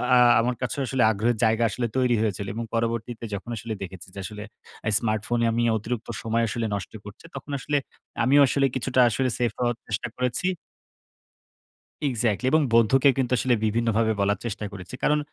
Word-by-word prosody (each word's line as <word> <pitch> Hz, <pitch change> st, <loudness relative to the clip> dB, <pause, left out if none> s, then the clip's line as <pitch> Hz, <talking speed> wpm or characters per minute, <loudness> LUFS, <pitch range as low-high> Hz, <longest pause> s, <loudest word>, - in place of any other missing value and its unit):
আ -, -, +7 dB, 0.2 s
আমার 125 Hz, +2 st, +1 dB
কাছে 170 Hz, -, -2 dB
আসলে 130 Hz, -1 st, +1 dB
আগ্রহের 110 Hz, +3 st, 0 dB
জায়গা 110 Hz, +1 st, +3 dB
আসলে 120 Hz, +3 st, -2 dB
তৈরি 125 Hz, -2 st, +3 dB
হয়েছিল 100 Hz, -2 st, -1 dB
এবং 115 Hz, -, -4 dB
পরবর্তীতে 115 Hz, 0 st, -2 dB
যখন 100 Hz, +4 st, -5 dB
আসলে 110 Hz, +2 st, -5 dB
দেখেছি 95 Hz, -2 st, -8 dB
যে -, -, -6 dB
আসলে 105 Hz, +1 st, -7 dB, 0.4 s
এই 110 Hz, -, +1 dB
smartphone 110 Hz, +1 st, -1 dB
এ -, -, +3 dB
আমি 120 Hz, +1 st, 0 dB
অতিরিক্ত 110 Hz, +2 st, -4 dB
সময় 115 Hz, 0 st, 0 dB
আসলে 115 Hz, +1 st, -2 dB
নষ্ট 100 Hz, -3 st, -6 dB
করছি 105 Hz, +9 st, -12 dB
তখন 140 Hz, +2 st, -7 dB
আসলে 145 Hz, +3 st, 0 dB, 0.5 s
আমিও 140 Hz, +4 st, +5 dB
আসলে 135 Hz, +2 st, +2 dB
কিছুটা 130 Hz, 0 st, 0 dB
আসলে 130 Hz, +3 st, 0 dB
সেফ 120 Hz, -2 st, +1 dB
হওয়ার 120 Hz, -1 st, +1 dB
চেষ্টা 110 Hz, +1 st, -2 dB
করেছি। 125 Hz, +7 st, -1 dB, 1.6 s
এক্সাক্টলি 120 Hz, -2 st, 0 dB
এবং 155 Hz, -, +4 dB
বন্ধুকে 125 Hz, +4 st, +5 dB
কিন্তু 130 Hz, -2 st, 0 dB
আসলে 125 Hz, +1 st, +2 dB
বিভিন্নভাবে 115 Hz, 0 st, +1 dB
বলার 100 Hz, 0 st, +1 dB
চেষ্টা 105 Hz, -2 st, -4 dB
করেছি। 100 Hz, +5 st, -8 dB
কারণ 150 Hz, 0 st, +3 dB
115 Hz, 175 wpm, -25 LUFS, 110-125 Hz, 1.6 s, আ